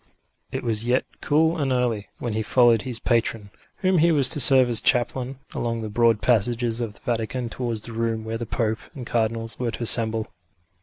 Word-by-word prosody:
It - - -4
was 115 -1 -2
yet 125 +1 +1 0.2
cool 160 +3 +2
and 140 -2 0
early, 120 -5 -1
when 120 -3 -4
he 110 - -1
followed 120 0 +3
his 125 -1 -5
patron, 115 -3 -1 0.3
whom 185 -2 +2
he 170 +2 +4
was 140 -5 +4
to 145 - +2
serve 130 -1 +6
as 120 -2 +3
chaplain, 125 +1 0 0.2
along 115 -1 -3
the 110 - -5
broad 115 0 +2
passages 120 0 +1
of 110 -3 -4
the - - -15
Vatican 120 -1 -3
towards 115 -3 -4
the 115 - -7
room 115 -1 -2
where 110 +1 -5
the 120 - -5
Pope 110 0 -1 0.2
and 130 -3 -7
Cardinals 115 -1 -2
were 125 -2 -1
to 115 - -5
assemble. 110 -1 +2
115 Hz, 200 wpm, -23 LUFS, 115-125 Hz, 0.3 s, serve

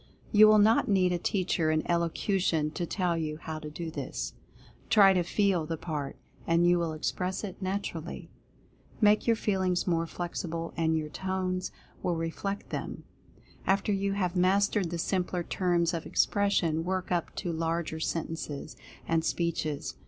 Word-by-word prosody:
You 215 0 +8
will 215 0 +7
not 215 +2 +5
need 185 -3 +3
a 175 - -1
teacher 180 -3 0
in 155 0 +1
elocution 170 -2 +1
to 170 +2 -3
tell 180 -2 0
you 155 -2 -2
how 160 0 -6
to 155 -1 -7
do 160 +2 -5
this. - - -4 0.6
Try 205 -4 +7
to 180 - +2
FEEL 180 -2 +1
the 165 0 -3
part, 150 -4 -4 0.3
and 170 +1 +4
you 175 0 +4
will 165 -2 -1
express 180 +5 -2
it 195 -1 -6
naturally. 185 -3 -4 0.7
Make 210 0 +4
your 230 - +5
Feelings 190 -4 0
more 165 -2 +1
flexible, 170 -1 -4
and 160 -1 +1
your 155 -1 -3
Tones 185 +1 -2 0.3
will 175 - 0
reflect 165 +5 -4
them. - - -4 0.6
After 195 +2 +2
you 200 0 0
have 185 -2 -1
mastered 190 +1 +2
the 170 - -3
simpler 180 0 -1
terms 175 -1 +1
of 165 - -3
expression, 175 -6 +2
work 185 +1 -2
up 175 -2 -1
to 175 - -3
larger 165 0 -2
sentences, 160 -2 -4 0.3
and 165 -1 +2
speeches. 155 - -1
175 Hz, 160 wpm, -29 LUFS, 165-190 Hz, 0.7 s, You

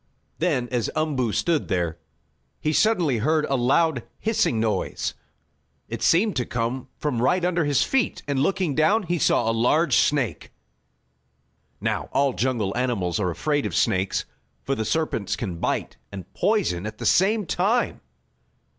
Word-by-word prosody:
Then, 145 -8 0
as 120 -3 -1
Umboo 140 -7 0
stood 145 - 0
there, 85 -3 -1 0.6
he 155 - -1
suddenly 170 - +2
heard 155 +6 +2
a 135 - 0
loud, 135 +3 +2 0.2
hissing 215 - +1
noise. 110 -1 -1 0.7
It - - -6
seemed 200 +5 +3
to 125 - +1
come 120 +2 -2
from 125 -6 -2
right 175 +8 +2
under 175 -3 +1
his 145 -2 +2
feet, 265 -3 0
and, 140 -2 0
looking 180 -1 +1
down, 160 +10 +3
he 175 -1 -1
saw 115 - +2
a 115 - +2
large 135 +9 +2
snake. 140 -6 +1 1.3
Now - - -2
all 140 -1 +2
jungle 115 -6 -1
animals 110 -9 -1
are 95 -3 0
afraid 145 - -1
of - - -5
snakes 95 -4 +1 0.4
for 135 - -1
the 110 -4 -2
serpents 155 - -1
can 90 -7 -5
bite - - -2
and 95 -3 -9
poison 160 - 0
at 110 0 -7
the - - -6
same 205 +3 +3
time. 210 +9 0
135 Hz, 155 wpm, -24 LUFS, 115-170 Hz, 1.3 s, seemed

